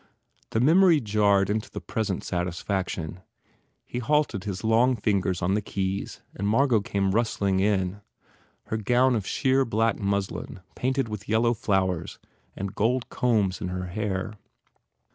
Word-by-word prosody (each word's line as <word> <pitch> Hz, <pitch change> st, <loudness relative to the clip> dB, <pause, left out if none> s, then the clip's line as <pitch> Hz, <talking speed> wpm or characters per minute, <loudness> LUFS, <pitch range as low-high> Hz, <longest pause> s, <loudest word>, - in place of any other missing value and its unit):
The 110 Hz, -, 0 dB
mem 160 Hz, +10 st, +5 dB
ory 170 Hz, -5 st, +6 dB
jarred 100 Hz, -4 st, +2 dB
into 110 Hz, +1 st, -2 dB
the -, -, -6 dB
present 105 Hz, -5 st, -3 dB
satisfaction. 90 Hz, -1 st, -3 dB, 0.7 s
He 120 Hz, -, -4 dB
halted 125 Hz, -6 st, 0 dB
his 100 Hz, 0 st, -4 dB
long 115 Hz, +3 st, +3 dB
fingers 95 Hz, -4 st, 0 dB
on 90 Hz, +2 st, +2 dB
the 105 Hz, -, +1 dB
keys 95 Hz, -1 st, -3 dB
and 100 Hz, -, -2 dB
Margot 115 Hz, 0 st, +3 dB
came 100 Hz, -1 st, 0 dB
rustling 100 Hz, -3 st, +1 dB
in, 95 Hz, -1 st, 0 dB, 0.6 s
her 110 Hz, -, -3 dB
gown 125 Hz, +4 st, +3 dB
of 105 Hz, -4 st, -2 dB
sheer 135 Hz, -1 st, +2 dB
black 115 Hz, -2 st, 0 dB
muslin 100 Hz, -1 st, -3 dB
painted 130 Hz, 0 st, -1 dB
with 105 Hz, -2 st, -7 dB
yellow 115 Hz, +2 st, +3 dB
flowers 95 Hz, -6 st, -1 dB, 0.4 s
and 95 Hz, 0 st, -4 dB
gold 120 Hz, +3 st, 0 dB
combs 105 Hz, -7 st, +1 dB
in -, -, -2 dB
her 90 Hz, 0 st, -4 dB
hair. 100 Hz, +1 st, -3 dB
105 Hz, 145 wpm, -26 LUFS, 95-115 Hz, 0.7 s, ory